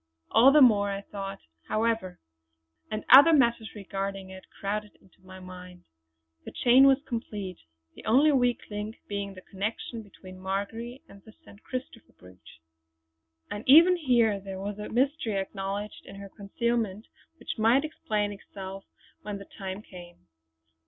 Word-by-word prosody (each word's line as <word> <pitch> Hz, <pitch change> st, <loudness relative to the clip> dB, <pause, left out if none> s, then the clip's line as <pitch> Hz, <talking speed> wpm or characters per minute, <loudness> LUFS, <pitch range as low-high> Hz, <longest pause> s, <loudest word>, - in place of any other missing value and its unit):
All 245 Hz, +5 st, +7 dB
the 300 Hz, +1 st, +6 dB
more 205 Hz, -5 st, +4 dB
I 200 Hz, 0 st, -3 dB
thought, 195 Hz, -1 st, -7 dB, 0.3 s
however; 220 Hz, -4 st, -1 dB, 0.7 s
and 215 Hz, 0 st, -4 dB
other 285 Hz, +6 st, +9 dB
matters 235 Hz, -6 st, +2 dB
regarding 195 Hz, -1 st, -5 dB
it 190 Hz, 0 st, -12 dB
crowded 210 Hz, +1 st, -5 dB
into 185 Hz, -, -26 dB
my 185 Hz, 0 st, -12 dB
mind. 180 Hz, -1 st, -11 dB, 0.6 s
The -, -, -8 dB
chain 260 Hz, +2 st, +5 dB
was 270 Hz, +1 st, +3 dB
complete, 210 Hz, -6 st, -5 dB, 0.3 s
the -, -, -13 dB
only 270 Hz, +8 st, +5 dB
weak 245 Hz, -3 st, +2 dB
link 210 Hz, +2 st, -5 dB
being 200 Hz, -1 st, -4 dB
the 185 Hz, -, -12 dB
connection 215 Hz, +4 st, -5 dB
between 185 Hz, -3 st, -14 dB
Marjory 215 Hz, +7 st, -4 dB
and 200 Hz, -, -15 dB
the 220 Hz, -, -16 dB
St. 200 Hz, -, -16 dB
Christopher 255 Hz, -3 st, -8 dB
brooch. 90 Hz, -3 st, -17 dB, 0.9 s
And 205 Hz, +1 st, -5 dB
even 335 Hz, +6 st, +8 dB
here 240 Hz, -, +2 dB
there 195 Hz, -1 st, -8 dB
was 205 Hz, +1 st, -5 dB
a 210 Hz, -, -6 dB
mystery, 255 Hz, -3 st, 0 dB
acknowledged 195 Hz, +1 st, -5 dB
in 195 Hz, -, -10 dB
her 200 Hz, 0 st, -9 dB
concealment, 215 Hz, +1 st, -2 dB, 0.3 s
which -, -, -6 dB
might 235 Hz, +7 st, +4 dB
explain 210 Hz, -9 st, -2 dB
itself 195 Hz, -1 st, -9 dB, 0.4 s
when 205 Hz, -1 st, -5 dB
the 200 Hz, -, -10 dB
time 195 Hz, +1 st, -7 dB
came. 175 Hz, -, -14 dB
205 Hz, 150 wpm, -27 LUFS, 195-235 Hz, 0.9 s, other